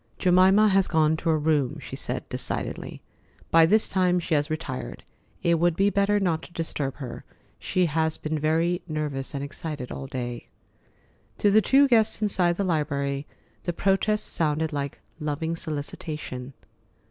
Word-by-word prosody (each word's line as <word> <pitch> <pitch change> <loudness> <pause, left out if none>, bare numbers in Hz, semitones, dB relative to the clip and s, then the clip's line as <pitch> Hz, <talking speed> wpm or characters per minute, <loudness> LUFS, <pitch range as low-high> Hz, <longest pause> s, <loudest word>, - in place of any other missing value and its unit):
"Jemima 190 +3 +5
has 195 -1 +3
gone 160 -1 +3
to 165 - -2
her 160 - +3
room," 150 -4 +1
she - - -8
said - - -4
decidedly. - - -5 0.5
"By 165 0 +7
this 215 +5 +4
time 180 -2 +2
she 170 -1 -3
has 145 0 +1
retired. 145 - -5 0.4
It 170 -1 +3
would 175 -1 +2
be 200 +3 +3
better 200 +1 +2
not 170 -5 0
to 175 - -13
disturb 145 -5 -3
her. 125 -5 -7 0.4
She 185 -1 +1
has 160 0 0
been 155 0 -3
very 165 +3 +1
nervous 150 -3 -3
and 140 - -3
excited 145 -2 -6
all 135 - -6
day." 120 -3 -5 0.9
To 205 - +3
the 215 +2 +6
two 275 +7 +5
guests 225 -4 +3
inside 185 -5 +2
the 200 - 0
library, 145 -5 -1 0.4
the 175 - -1
protest 200 +4 +1
sounded 155 -1 0
like 140 -1 -3 0.2
loving 155 +2 -2
solicitation. 145 -4 -5
160 Hz, 160 wpm, -26 LUFS, 145-185 Hz, 0.9 s, By